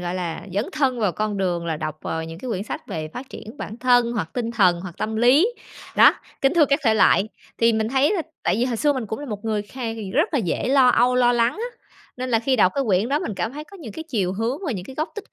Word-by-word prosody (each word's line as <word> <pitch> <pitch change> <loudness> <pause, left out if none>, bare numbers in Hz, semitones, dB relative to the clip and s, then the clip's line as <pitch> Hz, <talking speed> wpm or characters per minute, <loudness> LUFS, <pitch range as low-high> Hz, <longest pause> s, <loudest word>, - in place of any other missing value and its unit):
gọi 175 0 -3
là, 175 -3 -3
dấn 205 +4 +1
thân 260 -5 0
vào 205 -5 +1
con 215 -1 -2
đường 175 -3 -1
là 160 -2 -1
đọc 155 -1 -5
vào 160 0 -3
những 165 +1 -8
cái 255 - -7
quyển 195 -3 -2
sách - - -6
về 155 -1 -4
phát 250 - -8
triển 225 +6 -10
bản 220 - -6
thân 245 -1 +3
hoặc 195 -9 -3
tinh 235 -2 -2
thần, 185 -7 +3
hoặc 180 -2 -8
tâm 220 0 -2
lý, 265 - +5 0.5
đó, - - +8 0.3
kính 270 +4 +2
thưa 330 - +6
các 280 +2 +1
thể 225 - +4
loại. 215 0 +4 0.3
Thì 230 0 +4
mình 220 0 0
thấy 270 - +2
là 360 - 0 0.2
tại - - +1
vì 235 - +1
hồi 245 -3 -1
xưa 290 +4 +2
mình 255 -5 -4
cũng 220 - -4
là 290 - -7
một 210 -2 -6
người 215 -2 -1
kha 255 +5 -9 0.3
rất 300 +4 +1
là - - +3
dễ 200 +4 -1
lo 265 -2 +5
âu, 245 +1 +4
lo 245 -1 +4
lắng 235 0 +2
á, 475 +3 -6 0.4
nên 255 0 -4
là 225 - +4
khi 255 +3 +1
đọc 185 -4 +4
cái 275 -1 0
quyển 200 +2 +2
đó 285 +2 +1
mình 215 - -4
cảm 225 +6 -3
thấy 300 +1 -7
có 395 +5 -14
những 245 - -9
cái 320 - -6
chiều 195 - 0
hướng 230 +7 -2
và 275 - 0
những 185 -4 -5
cái 265 - -10
góc 310 +4 -2
tích 420 -1 -9
230 Hz, 285 wpm, -23 LUFS, 200-265 Hz, 0.5 s, đó